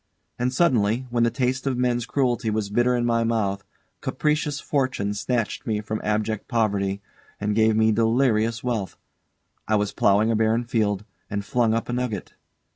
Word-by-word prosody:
And 125 +1 +1
suddenly, 125 -5 +2
when 120 -1 +1
the 115 - +4
taste 130 +3 -1
of 130 -2 0
men's 120 -1 0
cruelty 125 -5 0
was 105 -2 -2
bitter 120 +3 +2
in 120 -1 0
my 115 -1 +2
mouth, 100 -4 0 0.4
capricious 150 -1 0
fortune 130 -10 -1
snatched 115 +4 -2
me 110 -2 0
from 110 +1 -4
abject 110 0 -1
poverty 100 -4 0 0.4
and 105 0 -1
gave 110 0 +3
me 110 0 +4
delirious 115 0 +2
wealth. 115 -6 -2 0.7
I 110 - +2
was 105 -1 0
ploughing 105 +3 +3
a - - +1
barren 110 +2 +2
field, 105 -4 0 0.2
and 100 0 -3
flung 115 -1 +2
up 115 - -2
a 120 - -3
nugget. 120 -6 -3
115 Hz, 170 wpm, -24 LUFS, 105-125 Hz, 0.7 s, the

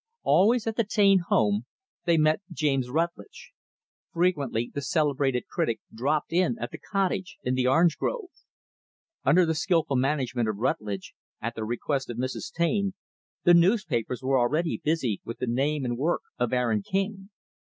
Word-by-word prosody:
Always, 225 +4 +4
at 225 -1 -3
the 230 - +3
Taine 200 -2 +4
home, 105 +2 +2 0.4
they 170 -1 +3
met 155 +3 +3
James 135 -5 0
Rutlidge. 170 - -3 0.6
Frequently 145 -10 0
the 145 - -3
celebrated 140 -2 0
critic 115 -2 -1
dropped 145 +8 -1
in 185 +6 +2
at - - -5
the - - -8
cottage 190 -2 -2
in 125 - 0
the 130 0 +1
orange 165 +4 +3
grove. 425 -7 -3 0.9
Under 175 +6 +5
the 160 - +1
skillful 160 -4 +1
management 130 -4 0
of 105 - -3
Rutlidge, 105 -4 -2 0.3
at 115 +1 -3
the 110 - -5
request 130 +4 -2
of 120 - -5
Mrs. 130 +1 -4
Taine, 195 +3 0 0.5
the 175 - +6
newspapers 170 - +2
were 130 0 +2
already 155 +7 0
busy 140 -10 0
with 115 - -7
the - - -2
name 135 +4 0
and 120 0 -2
work 165 +5 0 0.2
of 120 -1 0
Aaron 120 -4 +1
King. 195 - -3
145 Hz, 160 wpm, -27 LUFS, 125-175 Hz, 0.9 s, the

